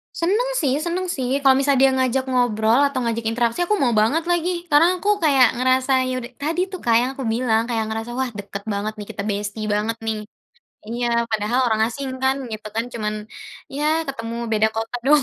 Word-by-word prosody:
Seneng 420 +9 +1
sih 275 -5 +1
seneng 350 +3 -2
sih 255 -5 -2
kalau 265 -1 +6
misal 280 0 +2
dia 270 +1 +5
ngajak 260 0 +1
ngobrol 235 -2 +2
atau 280 -2 -3
ngajak 230 -1 -2
interaksi 230 +2 0
aku 425 - +2
mau 260 -9 +2
banget 225 +10 +2
lagi, 345 0 0
karena 335 +5 +5
aku 410 +3 +1
kayak 270 -5 +6
ngerasa, 255 +1 +2 0.2
ya 255 - -2
udah 240 +1 -9
tadi 320 +4 0
tuh, 370 - -6
Kak, 230 -1 +3
yang 245 +2 +1
aku 270 - -6
bilang 225 0 +1
kayak 225 -2 0
ngerasa 225 +2 -4
wah 260 -1 0
deket 200 -1 -7
banget 205 +2 -2
nih 205 -1 -7
kita 200 - -5
bestie 205 +1 -3
banget 220 +2 -1
nih. 220 -1 0 0.7
Iya 240 +1 -2 0.2
padahal 220 +3 0
orang 220 -2 +1
asing 270 +4 -5
kan, 265 0 +2 0.2
gitu 215 -1 -6
kan, 225 +1 0
cuman 215 -2 -3 0.6
ya 295 - -1 0.2
ketemu 230 -4 -5 0.2
beda 220 0 +3
kota 225 +1 -4
doang, 295 0 +5
245 Hz, 200 wpm, -22 LUFS, 225-280 Hz, 0.7 s, kalau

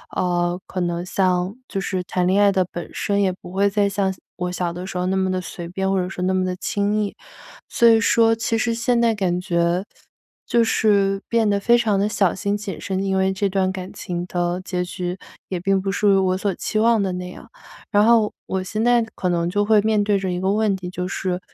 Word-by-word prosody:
呃， 175 0 0
可 190 - -4
能 175 0 -1
像 185 +1 0
就 195 - -3
是 185 -2 -2
谈 180 0 -1
恋 190 +2 +3
爱 200 - +5
的 190 -1 +2
本 175 - -6
身， 200 0 0
也 185 -1 +1
不 175 - -10
会 200 +1 +3
再 200 -1 +2
像 195 -1 0
小 185 - -19 0.2
我 180 -1 -2
小 180 -1 -2
的 180 +2 -6
时 180 -2 -4
候 180 - -1
那 190 +1 0
么 190 0 +1
地 185 0 -1
随 170 -1 -7
便， 190 +2 -2
或 195 -1 +1
者 180 - -1
说 180 -1 -5
那 185 - +1
么 185 0 +1
地 185 - -2
轻 205 +3 0
易。 205 - -5 0.5
所 235 - +3
以 225 -1 +6
说 225 0 +4
其 225 0 -1
实 230 +1 0
现 235 +1 +1
在 230 -1 +3
感 180 -4 0
觉， 175 +1 0 0.6
就 235 - +3
是 200 -3 +2
变 230 -2 +2
得 200 -1 +2
非 235 +4 +4
常 215 -4 +1
地 205 - +1
小 195 -4 +1
心 200 +2 -1
谨 200 -5 -6
慎， 190 0 -2
因 190 -1 0
为 190 0 +2
这 200 +1 -1
段 190 -1 +1
感 185 -1 -7
情 175 -1 -4
的 175 0 -1
结 180 -1 -2
局 180 0 -4 0.3
也 185 - -3
并 195 +1 +1
不 195 +1 -2
属 205 0 +2
于 195 - +4
我 185 -1 +2
所 200 -1 -1
期 215 - -2
望 225 -1 +3
的 190 - -1
那 180 0 -5
样。 230 - -12 0.4
然 205 +1 +4
后 225 -2 +4
我 190 0 -2
现 215 +4 -2
在 240 -1 +4
可 180 - -1
能 170 -1 0
就 205 +3 +1
会 215 0 +4
面 215 0 +2
对 205 -1 +2
着 190 -1 -2
一 180 - -2
个 190 +2 +1
问 210 -2 +1
题， 180 -1 -7
就 180 0 -4
是， 185 -1 -2
190 Hz, 265 characters per minute, -22 LUFS, 180-205 Hz, 0.6 s, 以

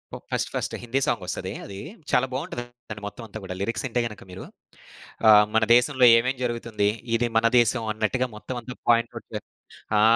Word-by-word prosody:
ఓహ్! - - -10
First - - -1
ఫస్టే, - - -2
హిందీ 120 +3 0
సాంగొస్తదీ - - -2
అదీ. 100 - -8 0.3
చాలా 125 - +4
బావుంటదండి 120 - -6
మొత్తమంతా 110 0 -9
కూడా. 95 -1 -6
లిరిక్సింటే 115 +3 -1
గనక 105 -3 -11
మీరు. 95 +1 -8 0.8
ఆహ్, 105 -1 +8
మన 110 - +4
దేశంలో 130 +1 +4
ఏమేం 130 +3 0
జరుగుతుంది, 115 -4 0 0.3
ఇది 120 +1 +1
మన 115 - +3
దేశం 120 0 +2
అన్నట్టుగా, 110 +4 0
మొత్తమంతా 125 +2 -7
పాయింట్ 115 0 +4
అవుట్ 115 - -8
చే 105 - -2 0.6
ఆ! - - +5
115 Hz, 160 wpm, -25 LUFS, 110-125 Hz, 0.8 s, ఆహ్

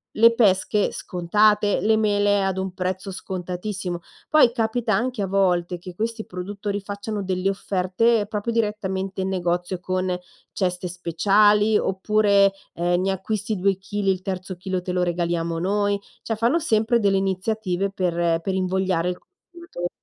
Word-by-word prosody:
le 230 +1 +6
pesche 200 -2 +3
scontate, 205 +3 +2
le 220 +1 +3
mele 205 -2 +2
ad 190 -1 -1
un 190 -1 -3
prezzo 185 +1 -3
scontatissimo." 180 0 -4 0.3
Poi 305 -6 +6
capita 225 -1 0
anche 240 +2 0
a - - -1
volte 180 -2 +1
che 180 0 -9
questi 225 +2 -3
produttori, 200 +3 -4
facciano 205 +1 -5
delle 185 0 0
offerte 200 +3 +1
proprio 210 +2 -3
direttamente 195 -4 -2
in 190 - -1
negozio 175 0 -1
con 185 0 -1 0.4
ceste 180 -1 -1
speciali, 205 +5 +3
oppure, 200 0 +3 0.2
ehm: 175 +1 +1
"Ne 195 +1 +1
acquisti 210 +3 -2
2 195 +1 +1
chili, 195 +1 -1
il 185 -1 -2
terzo 185 0 -4
chilo 185 0 -3
te 180 - -4
lo 180 0 +1
regaliamo 170 -1 -1
noi"; 200 +2 +1 0.2
cioè 225 - -2
fanno 235 +9 +2
sempre 230 -6 +2
delle 200 -3 +2
iniziative 195 0 -1
per 170 -3 0
per 190 +3 -2
invogliare 185 -2 0
il 180 - -3
consumato 345 - -9
195 Hz, 150 wpm, -23 LUFS, 180-210 Hz, 0.4 s, le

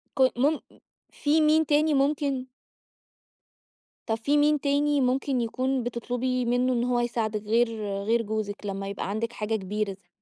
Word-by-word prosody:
كوي 260 -1 +4
مُم 285 +5 +2 0.5
في 300 +2 +2
مين 310 +1 +4
تاني 300 +1 +3
ممكن 275 -2 +1 1.6
طَب 220 - +1
في 280 +6 +1
مين 295 0 +3
تاني 285 0 +2
ممكن 260 0 +1
يكون 255 +3 -1
بتطلبي 245 +2 -2
منُّه 245 +2 +1
إن 240 -1 +1
هو 245 -1 +1
يساعدِك، 225 -3 -1
غير 225 +1 +1 0.2
غير 230 +2 +2
جوزِك 210 -1 -4
لمّا 195 0 -4
يبقى 200 0 -4
عندِك 230 +3 -2
حاجة 220 -1 -2
كبيرة 205 +1 -2
زي 190 -2 -17
245 Hz, 155 wpm, -26 LUFS, 220-280 Hz, 1.6 s, كوي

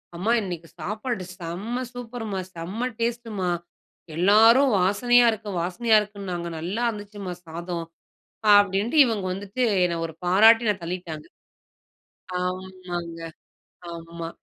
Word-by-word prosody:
"அம்மா, 200 +7 0
இன்னைக்கு 175 -4 -6
சாப்பாடு 210 +4 -3 0.2
செம்ம 200 +10 -4
சூப்பர்மா, 230 -5 -5 0.2
செம்ம 195 +9 -3
டேஸ்ட்டுமா 230 -5 -2 0.7
எல்லோரும் 225 +9 +6
வாசனையா 240 +6 +4
இருக்கு, 215 -1 -6
வாசனையா 220 +6 +2
இருக்குன்னாங்க 195 -4 -5
நல்லா 195 +9 -3
இருந்துச்சுமா 205 -3 -6
சாதம்." 170 +1 -5 0.7
அப்படின்ட்டு 205 +6 +2
இவங்க 215 -5 -2
வந்துட்டு 200 +6 -4 0.2
என்னை 170 -1 0
ஒரு 160 - -11
பாராட்டி 225 +5 +6
ந - - +2
தள்ளிட்டாங்க. 170 -3 -5 1.2
ஆமாங்க. 180 -2 -5 0.7
ஆமா. 165 0 -7
195 Hz, 105 wpm, -25 LUFS, 175-225 Hz, 1.2 s, எல்லோரும்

